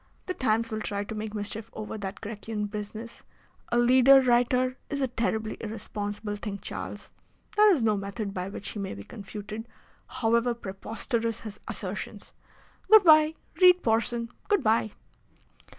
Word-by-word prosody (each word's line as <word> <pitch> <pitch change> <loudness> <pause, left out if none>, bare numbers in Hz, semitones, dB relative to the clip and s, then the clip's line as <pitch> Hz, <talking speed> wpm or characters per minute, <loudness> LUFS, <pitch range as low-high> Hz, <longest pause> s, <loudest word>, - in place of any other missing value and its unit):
The 370 - -2
Times 230 -5 0
will 215 0 -2
try 200 -1 -2
to 205 - -7
make 215 0 -5
mischief 210 +2 -4
over 215 0 -6
that 200 -1 -6
Grecian 210 0 -4
business. 210 +2 -7 0.5
A 240 - +2
leader 255 +3 +7
writer 255 0 +2
is 280 - -2
a 265 - +1
terribly 220 -3 -2
irresponsible 210 -1 -5
thing, 205 -1 -5
Charles. - - -7 0.4
There 420 0 +7
is 300 -11 +2
no 215 -1 +3
method 200 +1 -4
by 185 0 -3
which 200 - -5
he 210 - -6
may 195 - -4
be 100 - -8
confuted, 210 - -8 0.4
however 235 +1 +1
preposterous 230 +2 -3
his 215 -2 -8
assertions. - - -5 0.6
Good 435 -1 +9
bye! 310 -1 +6 0.3
Read 360 0 +7
Porson! 230 +1 +1 0.2
Goodbye!" 230 - +2
225 Hz, 150 wpm, -28 LUFS, 210-245 Hz, 0.6 s, Good